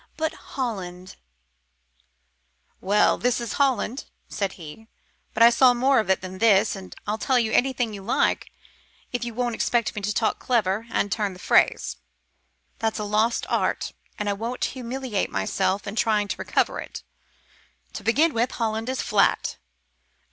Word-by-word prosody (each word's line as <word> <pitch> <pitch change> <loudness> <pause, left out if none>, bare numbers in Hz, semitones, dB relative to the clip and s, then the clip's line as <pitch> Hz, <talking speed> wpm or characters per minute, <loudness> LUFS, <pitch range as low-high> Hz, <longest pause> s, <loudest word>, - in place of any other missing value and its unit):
But 315 0 -1
Holland 185 - -6 0.9
" 65 0 -45
"Well, 205 +2 +3
this 245 -1 +1
is 235 -1 -4
Holland," 265 -1 +1 0.2
said 195 -2 -2
he; 170 +6 -11 0.5
"but - - +5
I 235 - +9
saw 250 +1 +5
more 265 +2 +3
of 215 - -2
it 190 - +2
than 185 0 -8
this, 215 -2 +4
and 190 -1 -10
I'll 210 +2 -2
tell 260 +2 +2
you 225 -2 +1
anything 245 -3 +1
you 200 - -7
like 220 +6 0 0.6
if 245 -1 -2
you 235 -2 -5
won't 245 -1 -1
expect 235 0 0
me 210 - -4
to 205 +1 -1
talk 220 +1 0
clever, 220 -2 0
and 205 -3 0
turn 205 -3 -1
the - - -12
phrase. - - +2 0.8
That's 225 -1 -1
a 210 - -3
lost 215 +3 +1
art, - - -1 0.2
and 210 - -3
I 205 - +1
won't 230 +5 -3
humiliate 255 -4 -3
myself 190 - -1
in 200 - -5
trying 215 -2 +2
to - - -2
recover - - 0
it. - - -8 0.9
To - - -7
begin 300 +8 +3
with, 235 +3 0
Holland 225 0 -2
is 260 - -2
flat." - - +1
220 Hz, 165 wpm, -24 LUFS, 200-245 Hz, 0.9 s, I